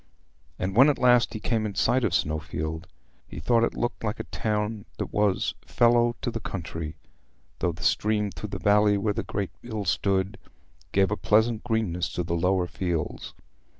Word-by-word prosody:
And 95 +1 -3
when 130 +5 +7
at 145 - +1
last 125 -2 +4
he - - -3
came 110 +1 0
in 105 -2 -3
sight 125 +6 +2
of 95 -7 +1
Snowfield, 80 +1 -2 0.4
he - - -8
thought 115 +9 +3
it - - 0
looked 120 - -2
like 105 +1 -2
a - - -2
town 105 -1 -2
that - - -4
was 105 -2 +1
"fellow 120 0 +3
to 120 - -1
the 115 - -4
country," 80 -6 -5 0.6
though 90 - +1
the 85 +1 -9
stream 105 -1 +1
through 95 +5 -7
the 95 - -4
valley 105 +2 +4
where 105 +1 0
the 115 - -2
great 100 -4 -3
mill 110 -4 -5
stood 95 +4 0 0.5
gave 95 0 +3
a 105 - 0
pleasant 110 +1 +2
greenness 110 -7 -1
to 90 - -1
the 85 - -3
lower 90 +2 +2
fields. 85 -2 -3
105 Hz, 185 wpm, -26 LUFS, 90-115 Hz, 0.6 s, when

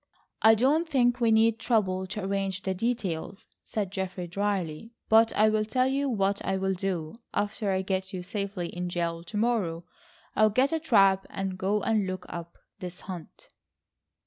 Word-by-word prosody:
"I 220 0 +7
don't 295 +9 +2
think 245 -4 +2
we 230 - +4
need 225 +1 +4
trouble 190 -6 +1
to 210 +1 -5
arrange 195 -1 -2
the 190 - 0
details," 195 -4 -3 0.2
said 205 -4 -3
Geoffrey 190 -2 -4
drily. 195 +1 -2 0.2
"But 225 +1 +6
I'll 215 0 +4
tell 255 +4 +1
you 275 +1 0
what 200 -4 0
I 190 - 0
will 190 0 0
do. 185 0 -3 0.2
After 205 0 -1
I 190 0 0
get 190 0 -2
you 185 -2 -5
safely 200 -2 -3
in 180 0 -4
jail 170 -1 -2
to 175 +5 -6
morrow, 205 -8 0 0.5
I'll 215 0 +5
get 255 +7 +2
a 325 - +1
trap 195 - +4
and 195 -1 -3
go 195 +2 0
and 215 -3 +1
look 185 0 -4
up 170 0 -8 0.2
this 180 -1 -7
hut." 180 -4 -9
195 Hz, 170 wpm, -28 LUFS, 185-225 Hz, 0.5 s, I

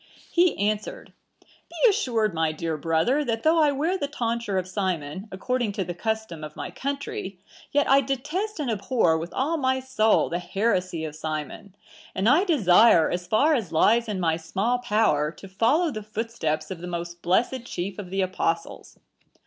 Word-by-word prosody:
He 350 0 +3
answered, 210 +1 -2 0.3
'Be - - -2
assured, 230 - 0
my 160 -1 +1
dear 160 +1 -3
brother, 165 - +1
that 230 -4 -2
though 325 +1 +4
I 300 -2 +4
wear 320 +7 -1
the 285 - -1
tonsure 235 -7 -2
of 185 -1 -1
Simon, 185 -2 -3
according 240 +2 -2
to 195 - -2
the 175 0 -5
custom 220 -4 -3
of 150 0 -8
my - - -6
country, 275 -9 -4 0.3
yet 290 0 +2
I 275 +1 +5
detest 300 - -3
and 275 -6 -1
abhor 210 -5 +1
with 170 +2 -6
all 305 +6 0
my 260 -2 +1
soul 255 -4 +2
the 175 - -2
heresy 185 -3 -1
of 155 -1 -7
Simon; 155 +5 -6 0.4
and 190 +3 0
I 305 - +5
desire, 215 - +5
as 175 0 -3
far 280 - +3
as 225 - -1
lies 230 +8 +3
in 205 -3 -3
my 165 -2 +1
small 195 +9 -1
power, 210 -11 +1
to 195 - -12
follow 240 - +2
the 215 -4 -5
footsteps 205 -8 -3
of 185 - -5
the 180 - -6
most 170 0 -5
blessed 235 +7 +1
chief 185 -2 -5
of 190 -3 -7
the 195 +1 -1
Apostles. 170 -3 -3
210 Hz, 180 wpm, -25 LUFS, 175-260 Hz, 0.4 s, I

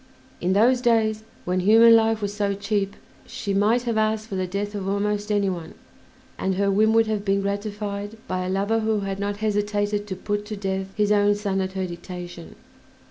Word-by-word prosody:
In 180 +2 +1
those 240 +5 +4
days, 220 -3 +2 0.2
when 180 +1 0
human 225 +4 +7
life 225 -1 +2
was 205 0 -2
so 200 -1 -1
cheap, 200 0 -1 0.3
she 200 - -4
might 215 +5 +2
have 230 -3 0
asked 215 0 0
for 195 - -4
the 185 -1 -1
death 200 +3 -3
of 195 -2 -3
almost 205 +1 -1
any 205 -1 +2
one, 175 -4 -5 0.6
and 190 0 0
her 200 +1 +1
whim 215 +3 +4
would 225 0 +5
have 215 -2 -2
been 195 -1 +1
gratified 205 +1 -4
by 185 0 -2
a 180 - -3
lover 200 +4 +1
who 220 -1 0
had 195 0 -4
not 200 0 -2
hesitated 205 0 0
to 190 - -4
put 205 +2 -3
to 215 - -4
death 190 -1 -2
his 210 -1 +1
own 205 0 +4
son 200 -2 -1
at 190 0 -3
her 190 -1 -2
dictation. 175 -1 -8
205 Hz, 200 wpm, -24 LUFS, 195-215 Hz, 0.6 s, human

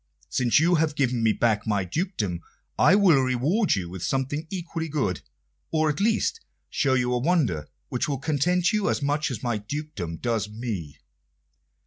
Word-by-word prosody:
Since 120 +3 +3
you 170 +3 +3
have 155 -2 0
given 125 -4 +1
me 110 -1 +4
back 110 -1 +1
my 100 -3 +1
dukedom, 105 - -2 0.3
I 190 - +5
will 180 -9 +5
reward 135 - +1
you 95 -3 -3
with 90 +1 -8
something 135 - -2
equally 170 -3 -4
good, 130 - -1 0.5
or, 155 -1 +2
at 145 - -6
least, 225 - +1 0.3
show 135 -3 +2
you 125 -1 +1
a 125 - +1
wonder 130 - +1 0.2
which 125 - -1
will 140 - -1
content 170 - +1
you 210 -2 +1
as - - -1
much 145 +1 0
as 125 -6 -5
my 120 -3 0
dukedom 105 - -5
does 115 -2 -1
me." 105 -10 -5
130 Hz, 170 wpm, -25 LUFS, 110-160 Hz, 0.5 s, I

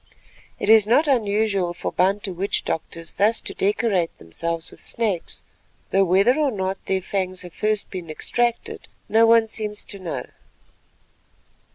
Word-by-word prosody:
It - - -3
is 220 -1 +6
not 285 +8 +4
unusual 205 -7 +1
for - - -4
Bantu 195 +1 0
witch 190 +3 -1
doctors 165 0 -4
thus 215 +3 +2
to - - -5
decorate 195 -4 0
themselves 165 - -4
with - - -14
snakes, 210 -7 -2 0.5
though 195 0 +4
whether 195 - +4
or 295 -2 +3
not 190 -4 -3
their 190 -1 0
fangs 185 -1 -2
have 175 -2 -10
first 215 +4 -1
been 180 -4 -6
extracted 235 +9 -2 0.2
no 225 +1 +5
one 230 0 +6
seems 210 -1 -3
to 200 - -5
know. 175 -3 -4
200 Hz, 150 wpm, -23 LUFS, 180-220 Hz, 0.5 s, is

